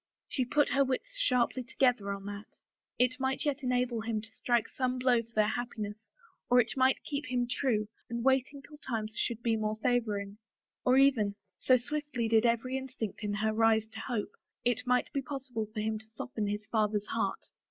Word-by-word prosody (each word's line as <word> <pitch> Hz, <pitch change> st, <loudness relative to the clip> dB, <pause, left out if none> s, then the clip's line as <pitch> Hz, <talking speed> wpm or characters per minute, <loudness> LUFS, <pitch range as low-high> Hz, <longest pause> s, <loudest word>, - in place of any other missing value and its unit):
She 255 Hz, -, -1 dB
put 290 Hz, +3 st, +2 dB
her 275 Hz, +2 st, +4 dB
wits 275 Hz, -, -3 dB
sharply 255 Hz, -, +2 dB
together 245 Hz, -5 st, +1 dB
over 200 Hz, 0 st, -5 dB
that. 205 Hz, +1 st, -8 dB, 0.4 s
It 250 Hz, +1 st, +2 dB
might 265 Hz, +2 st, -1 dB
yet 290 Hz, -1 st, 0 dB
enable 250 Hz, -2 st, 0 dB
him 225 Hz, -1 st, -1 dB
to 220 Hz, +1 st, -9 dB
strike 240 Hz, 0 st, +1 dB
some 255 Hz, -1 st, -1 dB
blow 250 Hz, -2 st, +3 dB
for 230 Hz, 0 st, -18 dB
their 215 Hz, -1 st, +4 dB
happiness 220 Hz, -3 st, -4 dB, 0.5 s
or 245 Hz, -, +6 dB
it 235 Hz, -1 st, +2 dB
might 260 Hz, 0 st, +3 dB
keep 290 Hz, 0 st, -3 dB
him 245 Hz, -1 st, 0 dB
true 225 Hz, -3 st, 0 dB, 0.2 s
and 235 Hz, 0 st, -3 dB
waiting 270 Hz, +1 st, +2 dB
till 300 Hz, 0 st, -14 dB
times 220 Hz, -5 st, -3 dB
should 235 Hz, -1 st, -1 dB
be 230 Hz, -1 st, +2 dB
more 215 Hz, 0 st, -1 dB
favoring. 210 Hz, -4 st, 0 dB, 0.4 s
Or 255 Hz, +1 st, +4 dB
even, 240 Hz, -7 st, +4 dB, 0.2 s
so 255 Hz, -, +5 dB
swiftly 255 Hz, -1 st, -2 dB
did 225 Hz, +1 st, +4 dB
every 235 Hz, +3 st, 0 dB
instinct 255 Hz, -5 st, -5 dB
in 205 Hz, -1 st, -1 dB
her 215 Hz, +1 st, +1 dB
rise 220 Hz, 0 st, +4 dB
to -, -, -9 dB
hope, 235 Hz, -5 st, -3 dB, 0.3 s
it 245 Hz, +1 st, +1 dB
might 250 Hz, +3 st, +2 dB
be 280 Hz, -, 0 dB
possible 260 Hz, -5 st, -4 dB
for 215 Hz, -1 st, -3 dB
him 220 Hz, 0 st, -1 dB
to 220 Hz, 0 st, -16 dB
soften 220 Hz, -1 st, -4 dB
his 210 Hz, +1 st, -3 dB
father's 210 Hz, -2 st, +1 dB
heart. -, -, -2 dB
240 Hz, 195 wpm, -31 LUFS, 220-260 Hz, 0.5 s, or